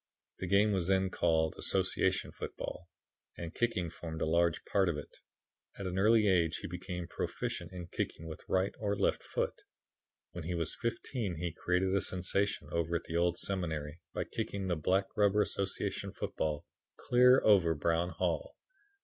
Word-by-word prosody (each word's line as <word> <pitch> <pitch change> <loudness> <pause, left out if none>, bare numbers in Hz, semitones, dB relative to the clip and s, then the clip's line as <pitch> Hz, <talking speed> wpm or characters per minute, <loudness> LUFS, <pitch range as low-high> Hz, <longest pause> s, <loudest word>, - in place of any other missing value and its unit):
The 95 - -3
game 100 +3 +4
was 95 -4 0
then 95 -1 +2
called 80 -3 +2
Association - - +1
Football, - - -6 0.5
and 85 -1 -6
kicking 95 -9 0
formed 80 -2 -6
a - - +1
large 85 +1 +2
part 95 -3 +2
of 80 - -1
it. 75 - -9 0.6
At 100 - -5
an 90 0 -1
early 110 +1 +5
age, 85 -4 +3
he - - -6
became 90 0 -5
proficient 85 +1 -4
in 90 -2 -6
kicking 80 -1 -4
with 80 -1 -7
right 95 +1 +2
or 100 -1 0
left 100 - +1
foot. - - -1 0.8
When 85 -2 -7
he 90 +1 -2
was 80 -2 -1
fifteen 115 -4 -2
he 85 +1 -2
created 90 +2 +1
a 100 - +3
sensation 95 +3 0
over 85 0 0
at 85 - -1
the 80 - -6
Old 85 0 +2
Seminary 80 -5 -2
by - - -2
kicking 100 -1 -3
the 85 - +2
black 95 +5 +2
rubber 105 0 +4
Association 100 -2 -2
football 75 -2 -2 0.3
clear 125 +1 +6
over 90 -6 +5
Brown 85 +3 +1
Hall. - - -2
90 Hz, 165 wpm, -33 LUFS, 85-100 Hz, 0.8 s, clear